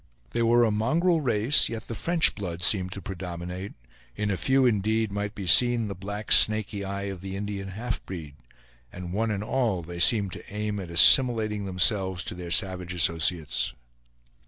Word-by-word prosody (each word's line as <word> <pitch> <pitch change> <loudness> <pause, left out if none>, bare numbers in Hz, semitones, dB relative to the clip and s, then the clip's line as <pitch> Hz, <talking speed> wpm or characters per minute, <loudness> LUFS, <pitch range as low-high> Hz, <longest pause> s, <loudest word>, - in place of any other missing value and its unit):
They 120 - -2
were 120 +1 +3
a 110 - 0
mongrel 155 +11 +1
race; 120 +1 +1
yet 115 -1 -6
the - - -7
French 165 +9 +1
blood 90 -4 -6
seemed 90 -1 +2
to 100 - -9
predominate; 90 +1 -7 0.4
in 105 -1 -2
a - - -1
few, 130 +6 +1
indeed, 110 -1 0
might 105 +1 -4
be 100 - -6
seen 120 +4 +4
the - - -4
black 100 +3 -7
snaky 105 -2 +5
eye 100 0 -5
of 95 -3 -6
the 95 0 -7
Indian 100 -1 -5
half 115 +5 -5
breed, 80 -6 -8 0.6
and 90 -1 -8
one 110 +3 -1
and 105 -1 -3
all, 115 -7 -1
they 85 +1 -8
seemed 100 +2 +4
to - - -10
aim 105 0 -4
at 90 -3 -8
assimilating 110 +3 +5
themselves 95 -1 0
to - - -3
their 90 -1 -8
savage 90 -1 -1
associates. 80 0 0
100 Hz, 180 wpm, -25 LUFS, 90-110 Hz, 0.6 s, snaky